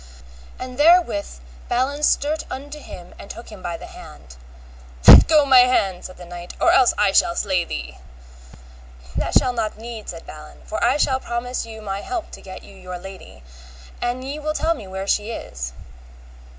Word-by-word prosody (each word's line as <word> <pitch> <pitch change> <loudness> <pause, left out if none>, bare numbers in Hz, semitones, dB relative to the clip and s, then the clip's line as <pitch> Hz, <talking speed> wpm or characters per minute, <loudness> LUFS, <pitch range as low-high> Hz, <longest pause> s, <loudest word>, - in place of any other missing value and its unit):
And 255 0 -8
therewith 305 - +4 0.4
Balin 265 +4 0
stert 300 +1 +1
unto 290 +3 -7
him 175 -10 -11
and - - -11
took 235 - -9
him 210 -3 -11
by 170 -2 -4
the - - -10
hand. 65 0 -13 0.7
Let - - +11
go 305 -2 +5
my 265 -2 +7
hand, 200 -7 +2
said 185 - -9
the 180 - -11
knight, 175 0 -9
or - - +4
else 255 -2 +4
I 205 -2 +3
shall 170 - +3
slay 185 -3 0
thee. - - -7 1.2
That - - -2
shall 250 - +1
not 220 -3 -3
need, 225 -1 -8
said 165 -1 -8
Balin, 150 0 -12
for 215 - -4
I 250 +4 +3
shall 265 -3 +1
promise 240 -1 -4
you 220 -1 -10
my 195 -1 -4
help 360 -4 -5
to - - -11
get 185 -1 -10
you 200 - -15
your 180 -1 -8
lady, 185 - -12 0.6
an 245 +1 -2
ye 280 +3 -5
will 305 0 -3
tell 330 +2 +1
me 210 - -10
where 190 +1 -5
she 210 +2 0
is. 60 - -6
220 Hz, 185 wpm, -21 LUFS, 185-260 Hz, 1.2 s, Let